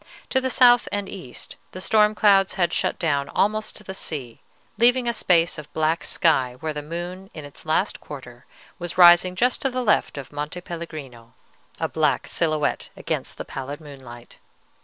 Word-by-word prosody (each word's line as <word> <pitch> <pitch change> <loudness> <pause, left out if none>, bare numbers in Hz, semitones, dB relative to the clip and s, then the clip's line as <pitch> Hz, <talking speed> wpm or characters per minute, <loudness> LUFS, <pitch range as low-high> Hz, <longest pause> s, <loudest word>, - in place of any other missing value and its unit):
To 260 - +2
the 260 - -1
south 245 -1 +5
and 205 -1 -2
east 155 -11 -8 0.2
the 185 - -7
storm 210 +2 +3
clouds 195 -2 +4
had 175 -3 +1
shut - - 0
down 140 -4 0
almost 215 +2 0
to - - -8
the 190 - -7
sea, 135 -11 -5 0.4
leaving 245 +1 +4
a 235 - +1
space 170 -7 +2
of 150 - -11
black 160 +1 0
sky 130 -7 +1
where 155 +1 -3
the 150 - -4
moon 175 +5 -6
in 155 -2 -7
its 145 +2 -13
last 180 +6 +1
quarter 125 -4 -11 0.3
was 175 0 -5
rising 175 +1 +7
just 245 +6 +1
to 270 - +1
the 255 0 -2
left 210 -8 +1
of 140 0 -8
Monte 150 +4 -4
Pellegrino, 155 -9 -9 0.4
a - - 0
black - - 0
silhouette 155 -3 -1
against - - -4
the - - -6
pallid 135 +2 -6
moonlight. 130 -6 -12
170 Hz, 180 wpm, -23 LUFS, 145-195 Hz, 0.4 s, rising